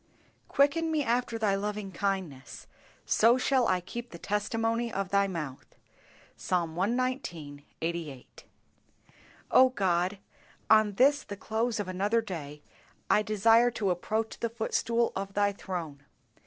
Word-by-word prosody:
"Quicken 305 +4 +2
me 310 -2 +1
after 240 -1 0
Thy 215 -3 +1
loving 205 0 -3
kindness, 185 -8 -4 0.4
so 230 +3 +4
shall 260 -1 +2
I 185 -1 +1
keep 235 +7 -7
the 170 - -10
testimony 225 +4 -1
of 195 -3 -3
Thy 200 0 +3
mouth." 155 -8 -6 0.6
Psalm 170 -3 -1
cxix. 190 - -2 0.2
88. 165 -6 -5 1.1
O 260 0 +7
God, 185 -4 0 0.5
on 215 -1 +5
this 280 +7 +4
the 200 - -8
close 225 +2 -1
of 205 - -3
another 200 +5 +1
day, 150 -8 -7 0.5
I 210 - +5
desire 225 +3 +4
to 210 -5 -1
approach 220 +5 -2
the 230 - -1
footstool 230 +1 0
of 195 0 -5
Thy 205 0 +3
throne. 170 -8 -6
205 Hz, 130 wpm, -29 LUFS, 180-230 Hz, 1.1 s, O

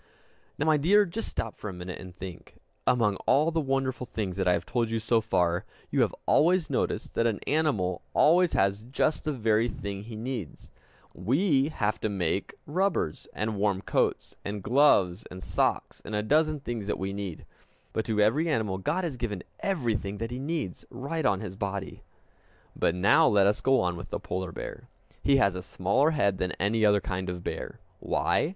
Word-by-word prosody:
Now, 145 - 0
my 155 -1 +4
dear, 200 +8 +5
just 210 +5 -4
stop 115 - -4
for 105 - -5
a - - -6
minute, 90 0 -7
and 90 -1 -10
think. 90 -1 -9 0.3
Among 105 -5 +3
all 155 +4 +4
the 165 0 +1
wonderful 135 -2 -1
things 100 -5 -3
that 95 -2 0
I 90 - +5
have - - -1
told 120 -2 0
you 115 - 0
so 115 +1 +2
far, 90 -5 +1 0.3
you - - +2
have - - +1
always 170 0 +3
noticed - - -1
that 115 - +2
an 110 -3 -1
animal 135 - +1
always 175 +3 +5
has 100 +1 +2
just 145 +4 0
the 155 - +1
very 115 -3 +2
thing 100 -2 -5
he 110 +2 -9
needs! 115 - -6 0.4
We 135 - +2
have 110 -6 -1
to 110 - -1
make 90 -5 -1
rubbers, 180 - -1
and 105 0 -2
warm 100 -1 +1
coats, - - 0
and 100 -1 -4
gloves, 105 -8 +3
and 90 0 -9
socks, - - -1
and 105 - -5
a 105 - 0
dozen 155 +4 +2
things 115 -6 -4
that 105 - -1
we 95 +1 -3
need. 100 -5 -5 0.5
But 110 - 0
to 110 -2 -1
every 140 +11 +3
animal 105 -9 0
God 160 - -1
has 155 -7 -3
given 105 -6 -3 0.2
everything 115 - -1
that 115 +2 -4
he 125 - -4
needs, 145 - -3
right 140 +5 -2
on 100 -1 +1
his 100 -4 -6
body. 100 -1 -4 0.7
But 85 - +1
now 95 +3 +5
let 100 -2 +4
us 105 +1 +2
go 135 0 +4
on 90 -1 0
with 85 - -8
the - - -3
polar 90 -1 -4
bear. - - -8 0.3
He 140 -1 +4
has 100 -8 +3
a 90 - -5
smaller 100 - +1
head 100 -12 +1
than 90 -1 -1
any 110 +3 0
other 105 -1 +5
kind 95 0 -3
of 90 -1 -5
bear. - - -5 0.2
Why? - - +1
110 Hz, 195 wpm, -28 LUFS, 95-140 Hz, 0.7 s, dear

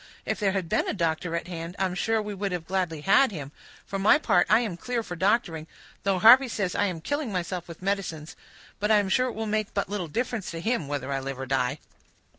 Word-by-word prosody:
If - - -2
there 200 -3 +1
had 190 -4 -2
been - - +1
a - - -2
doctor 165 -1 -1
at 170 - -3
hand, 170 0 -6
I 190 - +1
am 185 - -2
sure 225 +4 0
we 210 0 -5
would 185 -4 -3
gladly 175 -4 -2
have 195 - +3
had 270 -4 +4
him; 145 -7 -7 0.3
for 195 - -4
my 205 +9 +6
part, 195 -12 +2
I 215 +2 +5
am 215 -7 -3
clear 235 +6 -3
for 180 - -6
doctoring, 175 -4 0 0.3
though 195 -1 +1
Harvey 245 +8 +8
says 195 -6 -2
I 205 - +1
am 180 -5 -3
killing 285 - -2
myself 180 -1 -3
with 170 +1 -11
medicines; 185 -6 -3 0.4
but 210 +1 0
I 215 - +6
am 200 -2 +1
sure 255 +6 +2
it 245 - -5
will 220 +1 -3
make 215 -1 -2
but 200 - -1
little 200 -4 -3
difference 230 +3 -3
to 165 - -5
him, 220 - -1
whether 140 -1 -3
I 135 - 0
live 135 0 -5
or 135 - -4
die." 130 -1 0
190 Hz, 245 wpm, -26 LUFS, 165-215 Hz, 0.4 s, Harvey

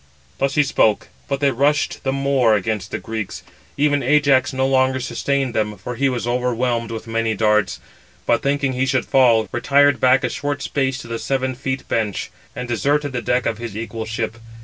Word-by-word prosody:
Thus 135 0 0
he 150 - +5
spoke, 110 -6 +1 0.2
but 140 0 -2
they 140 -1 +3
rushed 145 +4 0
the 135 - 0
more 135 -4 +2
against 105 -1 -2
the - - -3
Greeks. 110 -3 -5 0.3
Even 145 0 +2
Ajax 140 -1 +3
no 130 -1 0
longer 130 0 +2
sustained 130 +1 -1
them, 105 -2 -1
for 115 +6 -6
he 135 +3 +1
was 120 -4 -3
overwhelmed 120 -1 0
with 115 -1 -6 0.3
darts; 105 -1 +2 0.5
but, 115 - +2
thinking 140 -1 0
he 130 +1 0
should 130 -2 +1
fall, 115 -5 +4
retired 140 +3 +3
back 130 +1 +4
a 125 - +1
short 145 +2 -3
space 135 -2 -1
to - - -11
the 115 -1 -4
seven 130 -1 -1
feet 130 0 -4
bench, 105 -4 -2 0.2
and 125 - -5
deserted 145 +5 0
the 125 - -2
deck 125 +1 0
of 110 - -1
his 115 -3 -6
equal 115 0 -5
ship. 110 +1 -3
130 Hz, 190 wpm, -20 LUFS, 115-140 Hz, 0.5 s, he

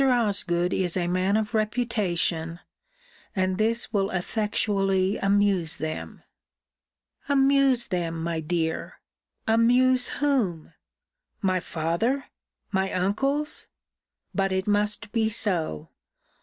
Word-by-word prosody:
Osgood 200 -8 +1
is 180 -1 0
a 175 - 0
man 185 +3 +1
of 220 +1 -2
reputation: 205 -7 0 0.8
and 185 0 0
this 230 +1 +1
will 195 -1 +1
effectually 195 0 +1
amuse 195 -4 +2
them. 155 0 -5 1.1
Amuse 275 -3 +4
them, 165 -4 -2
my 165 -1 -1
dear! 160 0 -2 0.5
Amuse 245 +3 +4
whom? 240 - 0 0.7
My 185 -1 +2
father! 175 - -1 0.5
my 190 -1 0
uncles! 275 +11 -1 0.7
But 195 -1 +1
it 190 0 0
must 210 +1 0
be 220 -2 +1
so! 180 - -1
200 Hz, 100 wpm, -26 LUFS, 175-230 Hz, 1.1 s, Amuse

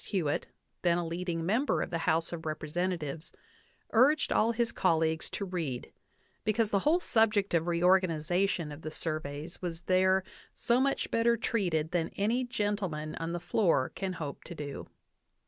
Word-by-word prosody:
Hewitt, 165 -8 -1 0.3
then 175 -1 +3
a 175 - -1
leading 170 0 -3
member 235 +10 +1
of - - -7
the 165 - -1
House 165 +2 +1
of 160 -1 -5
Representatives, 155 0 -3 0.6
urged 270 +7 +4
all 225 +2 +3
his 235 0 0
colleagues 160 -5 +1
to 200 - -4
read, 165 -9 -4 0.5
because 215 0 +1
the 200 - +3
whole 310 - +3
subject 215 - +2
of 165 0 +2
reorganization 175 -1 +2
of 145 +2 -9
the 155 - -5
surveys 155 0 -4
was 170 -2 -4
there 185 +1 +3 0.3
"so 240 +1 +2
much 275 +1 0
better 235 +1 +3
treated 175 -9 0
than 170 -2 0
any 230 +6 +1
gentleman 205 -10 -2
on 165 +1 -3
the 175 - -2
floor 165 -9 +2
can 190 -1 -3
hope 150 -5 -6
to 170 - -8
do." 145 -2 -6
175 Hz, 160 wpm, -30 LUFS, 160-205 Hz, 0.6 s, urged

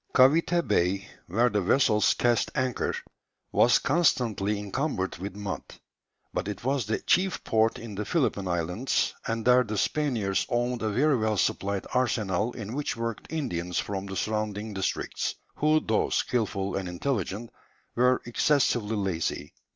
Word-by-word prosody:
Cavité 165 +6 +4
Bay, 95 +3 +1 0.2
where 115 +8 +3
the 105 0 +1
vessels 105 +1 +3
cast 120 -2 +2
anchor, 130 -3 0 0.6
was - - +5
constantly 115 - +1
encumbered 105 0 -2
with 100 +1 -5
mud, 100 -1 -4 0.7
but - - -2
it 105 0 -5
was 130 -4 0
the 110 - 0
chief 185 0 +1
port 110 0 +2
in 115 -2 -8
the 105 +2 -3
Philippine 125 - 0
Islands, 90 +8 0
and 115 -1 -2
there 125 +1 +6
the 105 -2 -4
Spaniards 115 -9 0
owned 120 0 0
a 110 - 0
very 140 +6 +3
well 110 -1 0
supplied 100 +1 0
arsenal 110 -4 +1
in 110 -1 -6
which 145 -3 -2
worked 115 -2 -4
Indians 90 - -2
from 100 -1 -2
the 95 - -6
surrounding 105 +2 -2
districts, 95 -1 -2 0.2
who 155 +1 +4
though 110 -7 0
skilful 100 -5 -1
and 95 -2 -3
intelligent 105 +2 -3 0.4
were 125 +1 +3
excessively 120 -3 +2
lazy. 90 -7 -2
110 Hz, 145 wpm, -27 LUFS, 100-125 Hz, 0.7 s, there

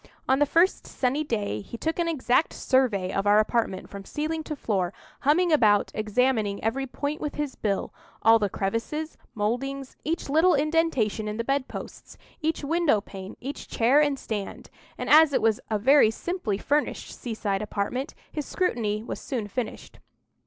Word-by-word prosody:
On 265 +1 +3
the 290 - +4
first 340 +6 +2
sunny 270 +4 0
day 210 - -2
he 235 - -8
took 320 +7 -2
an 340 - +1
exact 300 -2 +1
survey 220 -9 +1
of 195 +1 0
our 205 +1 +6
apartment 215 -2 0
from 200 -1 -9
ceiling 310 +8 -3
to 305 - -4
floor, 195 -9 -1 0.3
humming 335 +5 +3
about, 215 -9 +4
examining 215 -1 0
every 265 +5 -1
point 285 +4 -4
with 295 - -3
his 295 -3 -2
bill—all 225 +2 +1
the 205 -2 0
crevices, 230 +12 -3 0.2
mouldings, 260 +6 -2
each 330 +3 -2
little 320 +5 +4
indentation 285 -8 +1
in 210 0 -3
the 230 - -1
bed 275 +1 0
posts, - - -9 0.2
each 315 0 -1
window 320 -6 +2
pane, 195 -1 -9
each 275 +3 -6
chair 250 +6 +4
and 290 -2 +1
stand; 210 -6 -5 0.3
and, - - -4
as 310 -1 +7
it - - +2
was 220 -2 +3
a 215 - +1
very 260 +2 +6
simply 225 - -3
furnished 290 +7 -1
seaside 215 -4 -3
apartment, 215 +6 -3 0.2
his 300 -2 -4
scrutiny 220 - -1
was - - -6
soon 235 -6 -3
finished. 230 +3 -5
250 Hz, 165 wpm, -26 LUFS, 210-295 Hz, 0.3 s, as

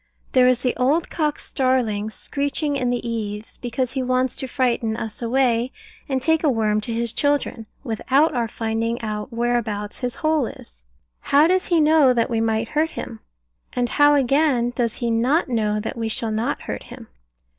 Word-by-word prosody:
There 255 -1 +5
is 255 -1 +2
the 250 - +1
old 290 +6 +1
cock 300 -3 0
starling 240 -6 0
screeching 285 +5 -2
in 255 -3 0
the 245 -1 -2
eaves, 215 -2 -4
because 245 +1 -2
he 265 0 -2
wants 255 0 +1
to 265 - -3
frighten 240 -3 0
us 225 -1 -5
away, 245 0 +1 0.4
and 265 -1 +1
take 320 +5 +1
a 305 - +4
worm 215 -4 +1
to 220 - -5
his 230 0 -1
children, 285 -6 0 0.2
without 270 +6 +1
our 240 -3 0
finding 225 +1 -2
out 210 0 -4
whereabouts 230 -3 -2
his 250 -1 -3
hole 310 -5 +1
is. - - -13 0.4
How 285 +2 +4
does 370 +2 +2
he 340 -2 +3
know 305 -4 +5
that 230 +1 +1
we 225 -1 +1
might 225 0 0
hurt 310 +2 +1
him? 230 -7 -7 0.5
and 245 -2 0
how 290 0 +5
again 270 -2 +2
does 230 -2 0
he 235 -2 -1
not 260 +8 +2
know 215 -3 0
that 220 - -4
we 225 -2 -2
shall 220 0 -2
not 220 +2 -2
hurt - - -5
him? - - -11
245 Hz, 185 wpm, -22 LUFS, 225-275 Hz, 0.5 s, There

